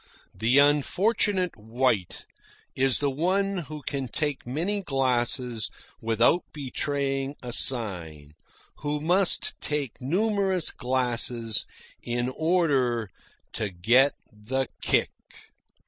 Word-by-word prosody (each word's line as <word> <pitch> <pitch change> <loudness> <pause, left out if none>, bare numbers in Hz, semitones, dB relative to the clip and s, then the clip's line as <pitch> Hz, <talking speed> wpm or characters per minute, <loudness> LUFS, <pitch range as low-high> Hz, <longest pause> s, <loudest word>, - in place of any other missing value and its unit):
The 120 +4 +2
unfortunate 180 - +2
wight 110 -3 -1 0.5
is 135 -1 +2
the 145 -1 0
one 190 +7 0
who 150 -2 -7
can 135 -1 -3
take 145 +2 -2
many 175 +11 -1
glasses 125 - 0 0.3
without 115 +9 +3
betraying 140 0 -2
a 120 -1 -3
sign, 85 - +1 0.4
who 150 +1 -2
must 180 +5 +2
take 145 -6 -3
numerous 190 - +1
glasses 120 -3 0 0.3
in 120 +1 -2
order 135 - +1 0.4
to 110 -3 -2
get 120 +10 +3 0.2
the 125 +5 -2
"kick." - - +2
135 Hz, 100 wpm, -26 LUFS, 120-155 Hz, 0.5 s, without